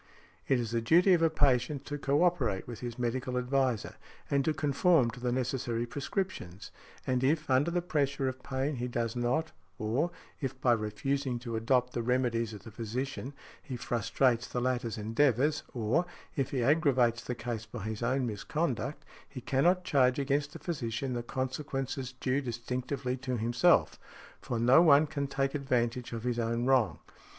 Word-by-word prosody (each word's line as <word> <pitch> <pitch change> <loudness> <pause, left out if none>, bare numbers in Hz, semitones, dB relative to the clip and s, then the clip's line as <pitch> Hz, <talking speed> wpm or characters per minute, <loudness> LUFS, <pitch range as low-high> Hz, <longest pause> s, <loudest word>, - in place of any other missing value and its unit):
It 135 - +3
is 115 -2 -3
the 115 0 0
duty 175 - +5
of 170 - +3
a 165 - +5
patient 140 -1 +1
to 145 - -4
co 140 +4 +2
operate 175 - +1
with 120 -3 -7
his 120 -2 -6
medical 125 +1 -2
adviser, 125 -3 0 0.3
and 140 -1 +3
to 160 - +3
conform 150 -2 +3
to 125 - -10
the 125 0 -1
necessary 125 -2 -1
prescriptions; 130 - -4 0.3
and 125 0 0
if, 155 +3 +2
under 130 +5 +4
the 175 0 -1
pressure 140 -5 0
of 130 0 -4
pain, 135 +1 -2
he 120 +1 -2
does 120 -1 -2
not, 125 +7 0 0.3
or, 120 +11 0 0.3
if 135 -2 -4
by 125 - +3
refusing 125 +5 -1
to 120 -2 -4
adopt 125 +2 +1
the 120 - -1
remedies 120 -2 0
of 105 -3 -9
the 115 - -10
physician, 125 +5 -4 0.3
he 130 - -6
frustrates 120 +1 +1
the 125 - -3
latter's 125 -2 -1
endeavours, 130 +6 +2
or, 125 +9 0 0.3
if 135 -3 0
he 130 -3 -1
aggravates 130 -5 +3
the 125 - -3
case 115 -2 -5
by 110 -1 -7
his 110 +1 -4
own 130 +2 +1
misconduct, 125 - -2 0.2
he 130 - -7
cannot 170 +9 +2
charge 130 -7 +3
against 140 +1 0
the - - -6
physician 130 -5 -3
the 120 - -2
consequences 130 +1 -3
due 130 +2 0
distinctively 125 +1 -3
to 130 -1 -3
himself; 120 +2 +3 0.4
for 120 - -3
no 125 +7 +6
one 155 -2 +6
can 140 -2 -3
take 135 0 -1
advantage 125 -3 -1
of 115 -1 -5
his 120 -1 -1
own 115 +1 0
wrong. 130 -4 +3
130 Hz, 175 wpm, -30 LUFS, 120-140 Hz, 0.4 s, no